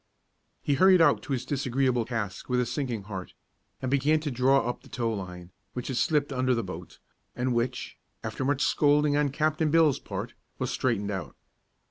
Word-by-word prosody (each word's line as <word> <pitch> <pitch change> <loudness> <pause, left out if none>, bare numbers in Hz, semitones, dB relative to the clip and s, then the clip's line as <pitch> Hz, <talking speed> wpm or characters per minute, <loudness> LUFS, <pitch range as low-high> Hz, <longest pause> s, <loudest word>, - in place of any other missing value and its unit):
He 145 - +1
hurried 185 +6 +6
out 155 -4 +5
to - - -8
his 130 -1 -1
disagreeable 130 -3 0
task 105 -5 -4
with 125 0 +2
a 125 - +2
sinking 120 -6 -3
heart, 95 -2 -7 0.5
and 130 - -1
began 145 +3 +3
to 150 -2 -3
draw 130 0 +3
up 125 - -3
the - - -17
tow 115 -2 -1
line, 90 -3 -7 0.2
which 125 +1 -5
had 130 - -2
slipped 145 -2 +1
under 130 -1 +2
the 115 - -1
boat, 90 -2 -8 0.4
and 125 0 0
which, 120 +1 -2 0.3
after - - -3
much 140 +1 +1
scolding 145 0 +3
on 145 -1 +2
Captain 155 +2 +1
Bill's 160 -3 +4
part, - - -6 0.2
was - - -2
straightened 105 -5 0
out. 90 -9 -5
130 Hz, 185 wpm, -28 LUFS, 115-145 Hz, 0.5 s, hurried